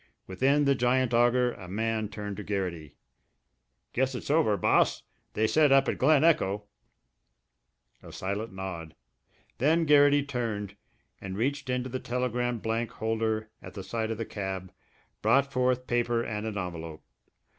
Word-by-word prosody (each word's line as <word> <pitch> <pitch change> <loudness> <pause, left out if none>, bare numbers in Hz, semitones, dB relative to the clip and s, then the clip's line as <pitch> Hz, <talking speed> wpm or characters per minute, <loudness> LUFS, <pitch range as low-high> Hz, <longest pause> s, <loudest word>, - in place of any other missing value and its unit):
Within 135 +10 +2
the 140 - +4
giant 125 -1 +1
auger 120 +1 +3
a 95 - -11
man 110 +2 -1
turned 105 -1 -6
to 105 - -5
Garrity. 85 -8 -4 1.0
"Guess 130 +1 0
it's 125 - -4
over, 145 -10 +3
Boss. - - +2 0.3
They 110 - +1
said 150 +5 +4
up 135 0 +5
at - - -1
Glen 145 +2 +4
Echo 105 -11 +2 0.8
" - - -47
A - - -12
silent 100 +4 -4
nod. 95 -4 -6 0.6
Then 160 +6 +3
Garrity 145 -1 +5
turned, 115 -7 -3 0.5
and 95 -1 -6
reaching 130 +2 -1
into 125 +1 -3
the 130 +1 -3
telegram 125 -1 -1
blank 115 +1 -2
holder 110 0 -2
at - - -11
the 95 - -6
side 110 +3 -3
of 115 - -3
the 115 - -3
cab, 95 -3 -5 0.5
brought 140 0 +3
forth 125 0 +1
paper 120 -1 0
and 105 -1 -4
an 105 -2 -4
envelope. 85 -4 -6
115 Hz, 155 wpm, -28 LUFS, 100-130 Hz, 1.0 s, up